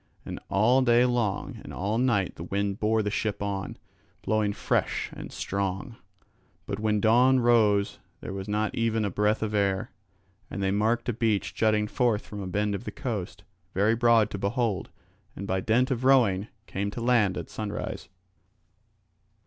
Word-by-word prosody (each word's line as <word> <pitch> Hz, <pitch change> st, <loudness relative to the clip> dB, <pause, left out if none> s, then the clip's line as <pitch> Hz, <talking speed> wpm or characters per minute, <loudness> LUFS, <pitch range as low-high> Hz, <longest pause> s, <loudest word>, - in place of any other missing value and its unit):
And -, -, -6 dB
all 115 Hz, +7 st, +4 dB
day 120 Hz, -1 st, +4 dB
long 120 Hz, -5 st, -1 dB
and -, -, -9 dB
all 105 Hz, +5 st, -1 dB
night 115 Hz, -8 st, +1 dB
the -, -, -8 dB
wind 100 Hz, +2 st, -2 dB
bore 110 Hz, 0 st, +2 dB
the 105 Hz, -, -1 dB
ship 105 Hz, -1 st, -2 dB
on, 100 Hz, -1 st, -3 dB, 0.5 s
blowing 110 Hz, -1 st, +1 dB
fresh -, -, -1 dB
and -, -, -8 dB
strong; 100 Hz, +5 st, -3 dB, 0.7 s
but 100 Hz, -, -4 dB
when 105 Hz, -1 st, +1 dB
dawn 125 Hz, +5 st, +5 dB
rose 110 Hz, -4 st, +3 dB, 0.2 s
there -, -, -6 dB
was 95 Hz, 0 st, -5 dB
not 105 Hz, 0 st, -1 dB
even 115 Hz, -1 st, 0 dB
a 100 Hz, -, -2 dB
breath 105 Hz, +3 st, +1 dB
of 105 Hz, -1 st, -2 dB
air. 100 Hz, -2 st, 0 dB, 0.6 s
And 100 Hz, -, -4 dB
they 95 Hz, -, +1 dB
marked 110 Hz, +4 st, +1 dB
a -, -, +1 dB
beach 110 Hz, -2 st, 0 dB
jutting 110 Hz, -1 st, +2 dB
forth 115 Hz, -1 st, 0 dB
from 105 Hz, -1 st, -7 dB
a 95 Hz, -, -5 dB
bend 105 Hz, +2 st, 0 dB
of 100 Hz, +4 st, -5 dB
the -, -, -4 dB
coast, 105 Hz, -5 st, -5 dB, 0.3 s
very 105 Hz, +4 st, +3 dB
broad 115 Hz, -2 st, +4 dB
to 100 Hz, -, -4 dB
behold, 105 Hz, 0 st, -1 dB, 0.5 s
and 100 Hz, -, -6 dB
by 95 Hz, -1 st, 0 dB
dint 120 Hz, +7 st, +2 dB
of 125 Hz, -1 st, -1 dB
rowing 115 Hz, -7 st, +4 dB, 0.2 s
came 100 Hz, 0 st, -3 dB
to 105 Hz, -, -6 dB
land 115 Hz, -6 st, +3 dB
at 85 Hz, -, -6 dB
sunrise. 105 Hz, -1 st, -5 dB
105 Hz, 175 wpm, -27 LUFS, 100-115 Hz, 0.7 s, dawn